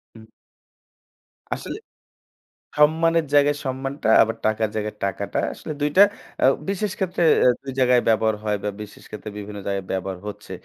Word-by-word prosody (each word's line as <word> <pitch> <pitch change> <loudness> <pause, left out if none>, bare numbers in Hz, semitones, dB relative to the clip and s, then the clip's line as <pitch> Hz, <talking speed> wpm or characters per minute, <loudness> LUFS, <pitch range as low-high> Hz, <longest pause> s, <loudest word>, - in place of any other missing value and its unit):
হুম। 110 -1 -13 1.3
আসলে - - -6 1.0
সম্মানের 165 +2 +3
জায়গায় 145 0 +4
সম্মানটা, 135 0 -3 0.2
আবার 115 0 -3
টাকার 110 0 +1
জায়গায় 105 0 -3
টাকাটা 100 - -2
আসলে - - -7
২ 145 - +2
টা - - +9 0.4
আ - - +6 0.2
বিশেষ 200 0 -1
ক্ষেত্রে 180 -2 -1 0.2
অ্যা 125 - +6
২ 135 - -5
জায়গায় 125 -1 +4
ব্যবহার 110 -1 +3
হয় 105 -1 0
বা 105 - 0
বিশেষ 105 - -11
ক্ষেত্রে 105 0 -7
বিভিন্ন 105 0 -7
জায়গায় 100 -1 -2
ব্যবহার 95 0 -3
হচ্ছে। 105 - -8
115 Hz, 150 wpm, -23 LUFS, 105-145 Hz, 1.3 s, টা